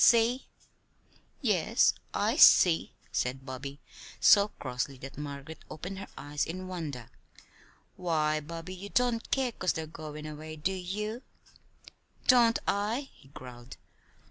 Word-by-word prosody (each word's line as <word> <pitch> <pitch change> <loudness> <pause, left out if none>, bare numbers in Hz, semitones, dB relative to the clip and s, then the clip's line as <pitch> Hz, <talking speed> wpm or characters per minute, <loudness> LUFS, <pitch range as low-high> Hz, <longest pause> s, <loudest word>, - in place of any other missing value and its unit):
See?" 235 +2 +5 1.0
"Yes, - - +3 0.2
I - - +1
see," 170 -3 +7 0.2
said 130 +1 -2
Bobby, 135 +2 -6 0.4
so 200 -1 +7
crossly 130 +1 -3
that 135 +2 -9
Margaret 145 +2 -7
opened 180 +5 -6
her 195 - -7
eyes 145 +1 -2
in 185 +3 -5
wonder. 150 -10 -6 0.9
"Why, 155 -4 +1
Bobby, 165 +4 -7
you 190 +2 -8
don't 245 -1 +1
care 265 -2 +1
'cause 185 -5 0
they're 160 - -4
goin' 155 -1 -8
away; 155 +1 -7
do 155 +5 -1
you?" 210 +6 -4 1.0
"Don't 235 -3 +6
I?" 220 +7 0
he - - -20
growled. 125 -2 -11
160 Hz, 125 wpm, -30 LUFS, 145-200 Hz, 1.0 s, see